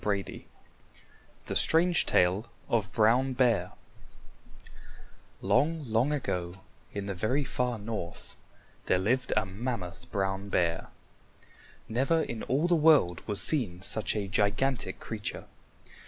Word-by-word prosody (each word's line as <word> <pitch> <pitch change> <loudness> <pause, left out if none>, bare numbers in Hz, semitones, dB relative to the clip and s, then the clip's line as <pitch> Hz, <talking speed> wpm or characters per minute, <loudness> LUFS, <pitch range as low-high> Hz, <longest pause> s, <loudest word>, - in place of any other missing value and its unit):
CHAPTER 100 -2 0
V - - -11 1.0
THE - - -4
STRANGE 170 0 +4
TALE 95 +6 +2 0.2
OF 110 -3 0
BROWN 120 +4 +2
BEAR 115 -8 +1 1.7
Long, 160 +1 +1
long 115 +4 +1
ago, 90 -10 -3 0.3
in 100 -1 -5
the 100 - -3
very 125 +10 -1
far 125 -2 -2
north, 105 -5 -6 0.5
there 95 - +3
lived 120 +8 0
a 105 - +2
mammoth 95 -3 -6
Brown 95 0 -2
Bear. 85 -3 0 1.0
Never 135 +8 +1
in 115 -2 -6
all 145 +7 0
the 175 - +3
world 150 - +4
was 105 -2 +1
seen 100 - +3
such 110 +2 +1
a 100 -2 -2
gigantic 110 +7 0
creature. - - -6
110 Hz, 125 wpm, -29 LUFS, 95-130 Hz, 1.7 s, STRANGE